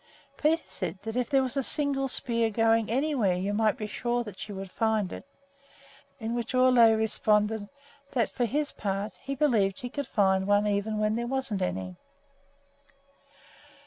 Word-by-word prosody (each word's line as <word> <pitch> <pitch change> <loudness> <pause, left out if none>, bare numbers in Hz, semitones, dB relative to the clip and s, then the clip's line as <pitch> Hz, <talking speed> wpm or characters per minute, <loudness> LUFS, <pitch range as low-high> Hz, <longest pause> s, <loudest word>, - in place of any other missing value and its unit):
Peter 320 +3 +1
said 185 -1 -4
that 225 +1 -5
if 250 -1 -1
there 270 -2 +3
was 255 0 -3
a 275 - +1
single 275 0 0
spear 230 -3 +1
growing 225 0 +2
anywhere, 250 -7 +1
you 190 +3 -2
might 220 +2 +2
be 215 - -4
sure 240 +3 -2
that 210 -4 -10
she 210 - -6
would 195 -1 -7
find 220 -4 0
it; - - -9 0.9
to 220 - -5
which 235 +1 -3
Ole 255 0 +5
jokingly 230 -2 +6
responded 210 -1 +1 0.4
that, 235 -4 +2
for 245 - 0
his 290 +5 -1
part, 200 +1 -4
he 275 0 -4
believed 220 -9 +2
she 245 - -6
could 285 +2 -4
find 190 -2 +2
one 205 0 +3
even 210 +1 -1
where 215 0 +1
there 235 +2 -2
wasn't 260 -6 -2
any! 90 0 -3
225 Hz, 175 wpm, -28 LUFS, 205-250 Hz, 0.9 s, jokingly